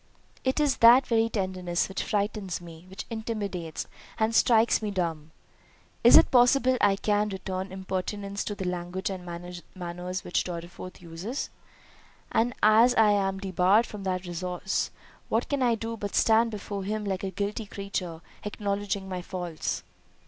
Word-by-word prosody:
"It 260 Hz, +3 st, +1 dB
is 295 Hz, -3 st, +2 dB
that 245 Hz, +3 st, +8 dB
very 225 Hz, -1 st, +2 dB
tenderness 185 Hz, -4 st, -1 dB
which 190 Hz, -, -3 dB
frightens 205 Hz, -2 st, -1 dB
me; 170 Hz, 0 st, -12 dB
which 190 Hz, -, -7 dB
intimidates, 205 Hz, -7 st, -4 dB, 0.3 s
and 220 Hz, 0 st, +1 dB
strikes 225 Hz, 0 st, +4 dB
me 215 Hz, -, -2 dB
dumb. 165 Hz, -5 st, -2 dB, 0.7 s
Is -, -, +10 dB
it -, -, +5 dB
possible 255 Hz, +1 st, +5 dB
I 195 Hz, -, +5 dB
can 210 Hz, +1 st, +1 dB
return 190 Hz, -1 st, -4 dB
impertinence 195 Hz, +1 st, -3 dB
to 205 Hz, -, -3 dB
the 190 Hz, -, -5 dB
language 180 Hz, +2 st, -3 dB
and 185 Hz, -2 st, -6 dB
manners 175 Hz, 0 st, -7 dB, 0.6 s
which 175 Hz, -, 0 dB
Mr. 175 Hz, -2 st, -4 dB
Dorriforth 175 Hz, +2 st, -10 dB
uses? 175 Hz, -, -5 dB, 0.8 s
and 240 Hz, +1 st, +1 dB
as 225 Hz, +4 st, +6 dB
I 215 Hz, -1 st, +5 dB
am 195 Hz, -1 st, +1 dB
debarred 190 Hz, +3 st, +3 dB
from 210 Hz, -3 st, -8 dB
that 185 Hz, -1 st, -1 dB
resource, 180 Hz, +2 st, -2 dB, 0.4 s
what 225 Hz, +2 st, +1 dB
can 285 Hz, -2 st, -1 dB
I 240 Hz, -2 st, +3 dB
do 225 Hz, +1 st, -4 dB
but 205 Hz, -1 st, -4 dB
stand 225 Hz, +1 st, +4 dB
before 205 Hz, -2 st, -5 dB
him 210 Hz, +2 st, -2 dB
like 190 Hz, -1 st, -2 dB
a 195 Hz, -, -1 dB
guilty 205 Hz, +3 st, -3 dB
creature, 190 Hz, -5 st, -4 dB, 0.2 s
acknowledging 200 Hz, -1 st, -2 dB
my 185 Hz, -1 st, -4 dB
faults." 175 Hz, -3 st, -4 dB
200 Hz, 155 wpm, -27 LUFS, 180-220 Hz, 0.8 s, Is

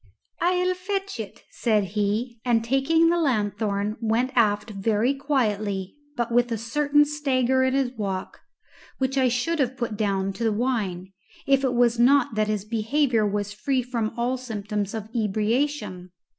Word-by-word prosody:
"I'll 360 Hz, +1 st, +2 dB
fetch 390 Hz, -, -4 dB
it," 210 Hz, -3 st, -7 dB
said 215 Hz, -4 st, +1 dB
he, 220 Hz, +3 st, -1 dB
and 235 Hz, -2 st, +2 dB
taking 315 Hz, +7 st, +3 dB
the 345 Hz, -, +1 dB
lanthorn 210 Hz, -6 st, 0 dB
went 230 Hz, +3 st, +1 dB
aft 215 Hz, -2 st, +2 dB
very 215 Hz, +5 st, +1 dB
quietly, 210 Hz, -9 st, -1 dB, 0.2 s
but 240 Hz, -1 st, -1 dB
with 240 Hz, 0 st, +2 dB
a 230 Hz, -, 0 dB
certain 290 Hz, +6 st, +2 dB
stagger 265 Hz, -3 st, +1 dB
in 260 Hz, 0 st, +2 dB
his 270 Hz, -3 st, +1 dB
walk, 195 Hz, -6 st, -4 dB, 0.6 s
which 265 Hz, 0 st, -1 dB
I 260 Hz, -1 st, +3 dB
should 250 Hz, +7 st, 0 dB
have 260 Hz, -1 st, 0 dB
put 235 Hz, -4 st, -3 dB
down 195 Hz, -2 st, 0 dB
to 235 Hz, -, -5 dB
the 225 Hz, -, +2 dB
wine 205 Hz, -6 st, -2 dB, 0.3 s
if 275 Hz, 0 st, +3 dB
it 255 Hz, -2 st, +1 dB
was 240 Hz, -1 st, +3 dB
not 255 Hz, 0 st, +4 dB
that 215 Hz, -1 st, +1 dB
his 210 Hz, -2 st, -2 dB
behaviour 230 Hz, +1 st, +1 dB
was 205 Hz, 0 st, -2 dB
free 255 Hz, +4 st, -1 dB
from 235 Hz, -3 st, -2 dB
all 245 Hz, +2 st, 0 dB
symptoms 210 Hz, -4 st, -4 dB
of 215 Hz, -1 st, -5 dB
ebriation. 220 Hz, -2 st, -1 dB
235 Hz, 160 wpm, -25 LUFS, 210-265 Hz, 0.6 s, not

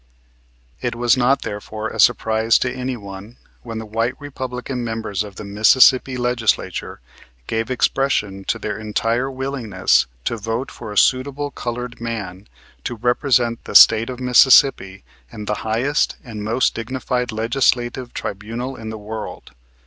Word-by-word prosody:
It 120 Hz, -1 st, -2 dB
was 120 Hz, 0 st, +3 dB
not, 130 Hz, +2 st, +2 dB
therefore, 110 Hz, +1 st, -5 dB
a -, -, -8 dB
surprise 110 Hz, -1 st, +3 dB
to 125 Hz, -, -1 dB
any 130 Hz, 0 st, -4 dB
one 100 Hz, +2 st, -10 dB, 0.2 s
when 115 Hz, -2 st, -7 dB
the 110 Hz, -, -5 dB
white 115 Hz, +4 st, -2 dB
Republican 130 Hz, -2 st, -5 dB
members 110 Hz, -4 st, -3 dB
of 105 Hz, -2 st, -6 dB
the -, -, -8 dB
Mississippi 125 Hz, +5 st, +4 dB
Legislature 120 Hz, -, -1 dB, 0.4 s
gave 115 Hz, -, -2 dB
expression 120 Hz, -6 st, 0 dB
to -, -, -1 dB
their 105 Hz, -1 st, -4 dB
entire 115 Hz, +4 st, -1 dB
willingness 115 Hz, -, 0 dB, 0.2 s
to 115 Hz, -, -1 dB
vote 115 Hz, +4 st, -3 dB
for 105 Hz, -, -9 dB
a 105 Hz, -, -6 dB
suitable 140 Hz, +4 st, +2 dB
colored 120 Hz, -1 st, -5 dB
man 100 Hz, -5 st, -5 dB, 0.4 s
to 120 Hz, -, -4 dB
represent 120 Hz, 0 st, +1 dB
the -, -, -7 dB
state 115 Hz, +2 st, +8 dB
of 125 Hz, -1 st, -6 dB
Mississippi 125 Hz, -5 st, +4 dB, 0.3 s
in 105 Hz, -, -8 dB
the 105 Hz, -, -1 dB
highest 120 Hz, +7 st, 0 dB
and 110 Hz, -4 st, -7 dB
most 115 Hz, +4 st, +1 dB
dignified 125 Hz, +1 st, -3 dB
legislative 120 Hz, +2 st, 0 dB
tribunal 115 Hz, +6 st, -5 dB
in 110 Hz, -2 st, -8 dB
the 110 Hz, -, -6 dB
world. 110 Hz, +1 st, -7 dB
115 Hz, 145 wpm, -20 LUFS, 110-125 Hz, 0.4 s, state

